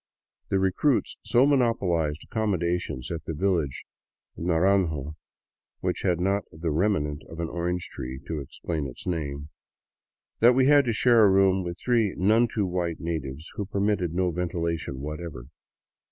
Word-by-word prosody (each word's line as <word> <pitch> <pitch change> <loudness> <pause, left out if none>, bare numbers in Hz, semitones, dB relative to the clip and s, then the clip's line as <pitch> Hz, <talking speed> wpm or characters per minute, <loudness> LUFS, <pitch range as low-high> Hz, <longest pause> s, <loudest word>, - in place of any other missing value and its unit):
The 95 - +2
recruits 95 +9 +1
so 125 +2 +4
monopolized 95 - +1
accommodations 90 - -2
at 80 -2 -5
the 80 - -4
village 85 -6 0 0.5
of 85 - -6
Naranjo 85 -4 +1 0.3
— - - -66
which - - -1
had 90 -3 +1
not 100 +2 +1
the 80 0 -3
remnant 75 -4 0
of 80 - -9
an 85 - -1
orange 90 0 -2
tree 65 +1 -6
to 80 -2 -3
explain 75 +2 -4
its 65 - -11
name 75 -4 -3 0.4
— - - -63
that 120 +2 +7
we 130 0 +4
had 145 0 +6
to 120 - +1
share 115 0 +5
a - - +6
room 95 0 +4
with 85 0 -5
three 115 -5 +1
none 110 +6 +4
too 105 -3 -1
white 90 -2 -2
natives 80 -2 -4
who 100 - -2
permitted 100 -3 0
no 90 -1 +1
ventilation 85 -5 -3
whatever. 75 -3 -6
90 Hz, 160 wpm, -26 LUFS, 80-100 Hz, 0.5 s, that